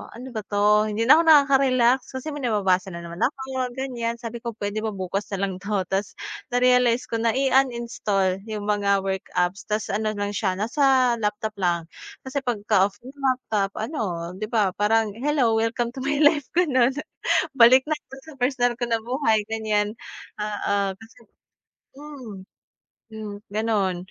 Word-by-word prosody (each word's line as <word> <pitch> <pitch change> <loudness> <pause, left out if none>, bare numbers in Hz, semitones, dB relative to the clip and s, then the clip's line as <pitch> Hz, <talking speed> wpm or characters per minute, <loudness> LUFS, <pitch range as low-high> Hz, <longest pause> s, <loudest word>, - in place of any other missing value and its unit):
"Ano 255 +2 -9
ba 220 - -4
'to? 210 +1 +3
Hindi 215 +2 -1
na 295 +7 +7
ako - - +3
nakaka-relax." 265 -4 +4
Kasi 300 +4 -4
may 290 - -6
nababasa 195 -6 0
na 170 - -7
naman 170 +1 -8
ako, 265 -2 -1
ganiyan. 240 -3 -3
Sabi 235 0 -7
ko, 235 -2 -6
"Puwede 205 0 -3
ba 215 -1 -3
bukas 190 +2 -3
na 195 - -3
lang 190 -2 -2
'to." 200 -1 -1
Ta’s 195 +2 -2 0.4
na-realize 250 -1 +4
ko 230 -3 -3
na 230 0 +1
i-uninstall 235 -8 +1
'yong 215 -2 -4
mga 200 -1 +1
work 190 -1 -3
apps 180 +3 -1
ta’s 210 0 -2
ano 215 +1 -1
na 205 0 -2
siya, 195 -3 -1
nasa 255 +3 +3
laptop 210 0 -2
lang. 175 -2 +1 0.4
Kasi 265 +2 -3
pagka-off 205 -5 +1
na - - -12
'yong 280 0 -17
laptop, 215 -6 0
ano, 230 +7 -4 0.4
'di 215 - -3
ba, 215 -4 +1
parang, 220 0 +2
"Hello, 275 -3 +2
welcome 235 +1 -1
to 260 - -9
my 280 +2 -1
life." 295 -2 +4
Gano'n. 265 -7 +3 0.6
Balik 255 +2 +7
na 310 - 0
'to 270 -2 -14
sa 315 +3 -13
personal 245 -2 +1
ko - - +1
na 230 - +2
buhay, 230 -2 +1
ganiyan. 215 -1 0 0.4
Oo, 210 -1 -2 0.2
kasi 225 +1 -16 0.8
mm, 280 -7 -9 0.8
hmm, 215 -2 -6 0.2
gano'n. 210 -4 0
225 Hz, 165 wpm, -24 LUFS, 205-255 Hz, 0.8 s, na